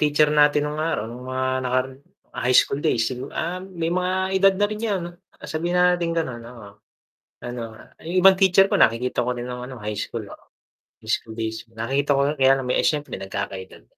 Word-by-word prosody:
teacher 150 Hz, 0 st, +3 dB
natin 150 Hz, 0 st, +4 dB
nung 150 Hz, +1 st, -3 dB
araw 160 Hz, -9 st, -1 dB
nung 125 Hz, +3 st, -9 dB
mga 130 Hz, 0 st, -1 dB
nakaraan, 130 Hz, +1 st, -1 dB, 0.4 s
ah, -, -, -6 dB
high 125 Hz, -, +5 dB
school 140 Hz, -, +3 dB
days 115 Hz, -5 st, +1 dB
sigu 130 Hz, +3 st, -6 dB
ah, 175 Hz, +3 st, -3 dB
may 175 Hz, -3 st, -4 dB
mga 185 Hz, 0 st, 0 dB, 0.3 s
edad 195 Hz, 0 st, +5 dB
na 205 Hz, +1 st, +2 dB
rin 215 Hz, 0 st, -5 dB
'yan. 205 Hz, -5 st, -1 dB, 0.4 s
Sabihin 170 Hz, +3 st, -2 dB
na 180 Hz, 0 st, +5 dB
natin 170 Hz, -1 st, -1 dB
ganun, 130 Hz, -8 st, -2 dB
oo. 115 Hz, -3 st, -11 dB, 0.8 s
Ano, 120 Hz, 0 st, -5 dB, 0.4 s
yung 170 Hz, +3 st, -1 dB
ibang 195 Hz, -, +9 dB
teacher 190 Hz, 0 st, +5 dB
ko -, -, -2 dB
nakikita 120 Hz, +2 st, +2 dB
ko 125 Hz, 0 st, -2 dB
rin 120 Hz, -, -5 dB
ng 125 Hz, +1 st, -6 dB
ano, 130 Hz, -, -8 dB
high 105 Hz, 0 st, -4 dB
school. -, -, -4 dB, 0.7 s
High -, -, -3 dB
school 110 Hz, -, -2 dB
days, 110 Hz, 0 st, -4 dB
nakikita 135 Hz, +5 st, 0 dB
ko -, -, +2 dB, 0.2 s
kaya 135 Hz, 0 st, +6 dB
lang, 125 Hz, -, -5 dB
eh, -, -, +2 dB
siyempre 150 Hz, -1 st, 0 dB
nagkaka-edad. 95 Hz, -6 st, -6 dB
140 Hz, 200 wpm, -23 LUFS, 120-170 Hz, 0.8 s, ibang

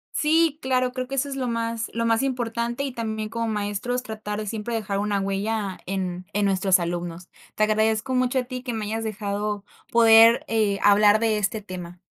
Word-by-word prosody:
Sí, 315 Hz, 0 st, +2 dB
claro, 255 Hz, -1 st, 0 dB
creo 255 Hz, 0 st, -4 dB
que 270 Hz, -, -6 dB
eso 275 Hz, +1 st, 0 dB
es 275 Hz, -, -5 dB
lo 255 Hz, -2 st, -2 dB
más 230 Hz, -1 st, -2 dB
lo 230 Hz, -, -1 dB
más 230 Hz, +1 st, +2 dB
importante 240 Hz, 0 st, -2 dB
y 280 Hz, -, -2 dB
también, 220 Hz, -2 st, -3 dB
como 230 Hz, +1 st, -3 dB
maestros, 215 Hz, +4 st, -2 dB
tratar 215 Hz, -3 st, -5 dB
de 215 Hz, -, -5 dB
siempre 225 Hz, +2 st, -4 dB
dejar 200 Hz, -3 st, -2 dB
una 205 Hz, -1 st, 0 dB
huella 195 Hz, 0 st, -2 dB
en 185 Hz, -1 st, -3 dB
en 205 Hz, 0 st, +1 dB
nuestros 190 Hz, -1 st, +3 dB
alumnos. 175 Hz, 0 st, -4 dB, 0.3 s
Te 215 Hz, -, -1 dB
agradezco 220 Hz, +3 st, +1 dB
mucho 255 Hz, +1 st, +2 dB
a -, -, -2 dB
ti 250 Hz, 0 st, -6 dB
que 245 Hz, -2 st, -4 dB
me 215 Hz, -2 st, -3 dB
hayas 225 Hz, +1 st, -3 dB
dejado 205 Hz, -1 st, -3 dB, 0.3 s
poder, 230 Hz, 0 st, +7 dB
eh, 215 Hz, -3 st, +1 dB
hablar 205 Hz, +1 st, +5 dB
de 220 Hz, -2 st, +1 dB
este 210 Hz, +1 st, -1 dB
tema. 180 Hz, -2 st, -8 dB
220 Hz, 200 wpm, -24 LUFS, 205-235 Hz, 0.3 s, poder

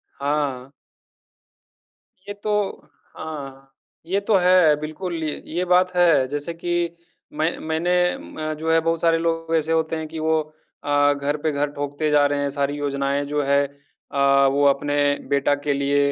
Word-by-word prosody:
हाँ। 140 Hz, -2 st, -2 dB, 1.6 s
ये 205 Hz, -, -4 dB
तो 210 Hz, -1 st, 0 dB, 0.6 s
हाँ, 135 Hz, -3 st, -8 dB, 0.3 s
ये 190 Hz, +4 st, 0 dB
तो 205 Hz, +1 st, +1 dB
है। 180 Hz, -4 st, +5 dB
बिल्कुल, 165 Hz, +2 st, -5 dB
य 150 Hz, -, -3 dB
ये 180 Hz, +1 st, 0 dB
बात 180 Hz, 0 st, +3 dB
है 160 Hz, -7 st, +4 dB
जैसे 145 Hz, +4 st, -4 dB
कि 170 Hz, 0 st, -2 dB, 0.4 s
मैं 155 Hz, +3 st, -1 dB
मैंने 160 Hz, +3 st, -1 dB, 0.2 s
अ, 155 Hz, 0 st, -5 dB
जो 160 Hz, 0 st, -1 dB
है 165 Hz, -, +5 dB
बहुत 165 Hz, 0 st, -1 dB
सारे 165 Hz, -1 st, +3 dB
लोग 165 Hz, 0 st, -1 dB
ऐसे 160 Hz, 0 st, 0 dB
होते 160 Hz, 0 st, +1 dB
हैं 160 Hz, -1 st, -4 dB
कि 160 Hz, 0 st, -7 dB
वो 160 Hz, 0 st, +2 dB, 0.4 s
अ, 145 Hz, 0 st, +3 dB
घर 145 Hz, +1 st, -2 dB
पे 155 Hz, -, +1 dB
घर 145 Hz, 0 st, -1 dB
ठोकते 145 Hz, +2 st, -3 dB
जा 145 Hz, -1 st, +5 dB
रहे 145 Hz, 0 st, 0 dB
हैं। 140 Hz, -, 0 dB
सारी 140 Hz, 0 st, -1 dB
योजनाएँ 140 Hz, 0 st, -1 dB
जो 145 Hz, +1 st, -1 dB
है 140 Hz, +1 st, +3 dB
अ, 140 Hz, -1 st, 0 dB
वो 145 Hz, +1 st, +2 dB
अपने 145 Hz, +1 st, +1 dB, 0.3 s
बेटा 140 Hz, 0 st, +2 dB
के 145 Hz, -, +2 dB
लिए, 140 Hz, 0 st, +1 dB
150 Hz, 170 wpm, -22 LUFS, 140-165 Hz, 1.6 s, है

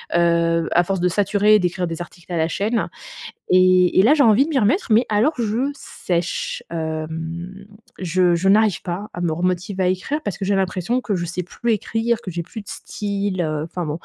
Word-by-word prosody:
Heu, 170 Hz, -1 st, +2 dB
à 175 Hz, -, +4 dB
force 190 Hz, 0 st, -2 dB
de 180 Hz, -, +3 dB
saturer 205 Hz, +3 st, +3 dB
et -, -, +5 dB
d'écrire 180 Hz, 0 st, -1 dB
des 165 Hz, -1 st, -5 dB
articles 175 Hz, +1 st, -11 dB
à 175 Hz, -, -1 dB
la 160 Hz, 0 st, +2 dB
chaîne 215 Hz, +6 st, -1 dB, 0.6 s
et 185 Hz, 0 st, +5 dB
et -, -, +8 dB
là, 245 Hz, +9 st, +5 dB
j'ai 300 Hz, -, +3 dB
envie 230 Hz, +2 st, +5 dB
de -, -, -6 dB
m'y 285 Hz, -, +1 dB
remettre. 250 Hz, -, +2 dB
Mais 225 Hz, +3 st, +5 dB
alors 220 Hz, +9 st, +2 dB
je 235 Hz, +3 st, -1 dB
sèche, 175 Hz, -10 st, -3 dB
hem, 165 Hz, +4 st, -5 dB, 0.3 s
je 180 Hz, 0 st, +2 dB
je 175 Hz, +3 st, +1 dB
n'arrive 205 Hz, -2 st, +4 dB
pas 185 Hz, +4 st, -5 dB
à 175 Hz, -, -7 dB
me 175 Hz, -2 st, 0 dB
remotiver 180 Hz, +3 st, -1 dB
à -, -, +3 dB
écrire 185 Hz, +12 st, -2 dB
parce 205 Hz, -, -3 dB
que 195 Hz, -, -3 dB
j'ai 200 Hz, -, +2 dB
l'impression 190 Hz, +5 st, -1 dB
que 210 Hz, -, -2 dB
je 175 Hz, -1 st, -3 dB
sais 170 Hz, +2 st, -3 dB
plus 230 Hz, +6 st, -2 dB
écrire, 225 Hz, +2 st, 0 dB
que 190 Hz, -, -6 dB
j'ai 170 Hz, 0 st, -3 dB
plus 205 Hz, +6 st, -9 dB
de 200 Hz, -, -17 dB
style, 200 Hz, -2 st, -3 dB
heu, 155 Hz, -2 st, -2 dB
enfin, 175 Hz, +2 st, -5 dB
bon. 155 Hz, -, -4 dB
185 Hz, 220 wpm, -21 LUFS, 170-210 Hz, 0.6 s, et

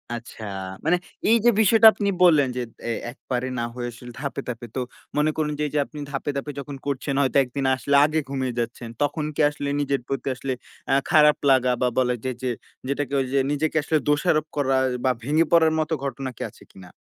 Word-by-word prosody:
আচ্ছা। 115 Hz, -1 st, -9 dB, 0.4 s
মানে 180 Hz, +2 st, +4 dB, 0.3 s
এই 230 Hz, -, +6 dB
যে -, -, +8 dB
বিষয়টা 225 Hz, +1 st, +7 dB
আপনি 200 Hz, -1 st, -1 dB
বললেন 150 Hz, -6 st, +6 dB
যে -, -, 0 dB, 0.3 s
এ -, -, +1 dB, 0.2 s
একবারে 125 Hz, -1 st, -4 dB
না -, -, -1 dB
হয়ে 120 Hz, -1 st, -3 dB
আসলে 120 Hz, +1 st, -11 dB
ধাপে, 140 Hz, -1 st, -3 dB
ধাপে। 120 Hz, 0 st, -5 dB
তো 130 Hz, -, 0 dB, 0.4 s
মনে 155 Hz, +1 st, +3 dB
করুন 150 Hz, -1 st, 0 dB
যে -, -, +1 dB
এই -, -, -8 dB
যে -, -, +3 dB
আপনি 150 Hz, -, -10 dB
ধাপে, 140 Hz, +1 st, -3 dB
ধাপে 145 Hz, +2 st, -4 dB
যখন 140 Hz, 0 st, -6 dB
করছেন। 140 Hz, 0 st, -2 dB
হয়তো 135 Hz, 0 st, +2 dB
একদিন 135 Hz, +2 st, -4 dB
আসলে 140 Hz, +2 st, 0 dB
আগে 155 Hz, +1 st, 0 dB
ঘুমিয়ে 130 Hz, -3 st, -2 dB
যাচ্ছেন। 115 Hz, 0 st, -4 dB
তখন 145 Hz, +1 st, 0 dB
কি -, -, +1 dB
আসলে 145 Hz, -1 st, -4 dB
নিজের 140 Hz, -2 st, 0 dB
প্রতি 135 Hz, 0 st, -3 dB
আসলে 130 Hz, 0 st, -3 dB, 0.4 s
আ -, -, +4 dB, 0.2 s
খারাপ 150 Hz, -1 st, +6 dB
লাগা 130 Hz, -1 st, +4 dB
বা 125 Hz, -, +3 dB
বলা 125 Hz, -1 st, +2 dB
যায় 130 Hz, -1 st, -2 dB
যে 125 Hz, -, 0 dB, 0.4 s
যেটাকে 140 Hz, 0 st, -2 dB
ওইযে 135 Hz, +1 st, 0 dB
নিজেকে 155 Hz, +2 st, -1 dB
আসলে 155 Hz, -, +2 dB
দোষারোপ 155 Hz, +1 st, +2 dB
করা 135 Hz, -2 st, +1 dB, 0.3 s
বা 130 Hz, -, +4 dB
ভেঙে 155 Hz, +5 st, +2 dB
পড়ার 160 Hz, -2 st, +5 dB
মত 155 Hz, -, -1 dB
ঘটনা 135 Hz, -1 st, -3 dB
কি -, -, -10 dB
আছে -, -, -18 dB
কিনা? 90 Hz, -2 st, -13 dB
140 Hz, 210 wpm, -24 LUFS, 130-150 Hz, 0.4 s, যে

